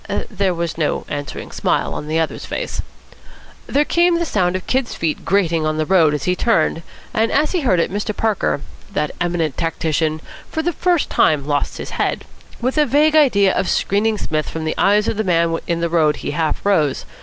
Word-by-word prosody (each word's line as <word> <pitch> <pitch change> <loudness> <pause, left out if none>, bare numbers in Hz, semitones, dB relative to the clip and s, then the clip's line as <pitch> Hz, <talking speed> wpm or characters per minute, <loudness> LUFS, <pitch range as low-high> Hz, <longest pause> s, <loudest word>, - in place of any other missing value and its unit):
There 195 -3 0
was 170 -1 -3
no 155 - 0
answering 145 -1 -5
smile - - 0
on 150 - -5
the 155 +1 0
other's 165 -1 -2
face. - - -4 0.9
There 290 +2 +2
came 345 +1 +3
the 340 - 0
sound 185 - 0
of 185 - -3
the - - -6
Kid's 260 -2 0
feet 160 -2 -2
grating 170 -5 +1
on 155 0 0
the 155 - 0
road 160 -4 +4
as 145 - -4
he 180 - +1
turned; 165 -7 +1 0.3
and 225 +1 +1
as 300 +2 +2
he 360 - 0
heard 190 - +2
it 165 - 0
Mr. 205 +1 -3
Parker, 215 -9 0 0.3
that 150 0 -1
eminent 170 -4 -1
tactician, 160 -1 -1 0.3
for 320 - -2
the 345 +1 0
first 350 -1 +1
time 150 -3 +3
lost 145 -1 -1
his - - -7
head. - - -1 0.3
With 255 +5 0
a 300 - +4
vague 300 +4 +3
idea 200 -11 +4
of 185 - 0
screening 215 +2 +1
Psmith 155 -5 -2
from 160 -1 -5
the 155 - 0
eyes 210 +2 +3
of - - -1
the 220 - +1
man 170 -3 +1
in 170 -1 -1
the 170 - +1
road 160 -3 +3
he - - -5
half 160 +3 -2
rose. 155 -9 +1
180 Hz, 210 wpm, -19 LUFS, 160-225 Hz, 0.9 s, road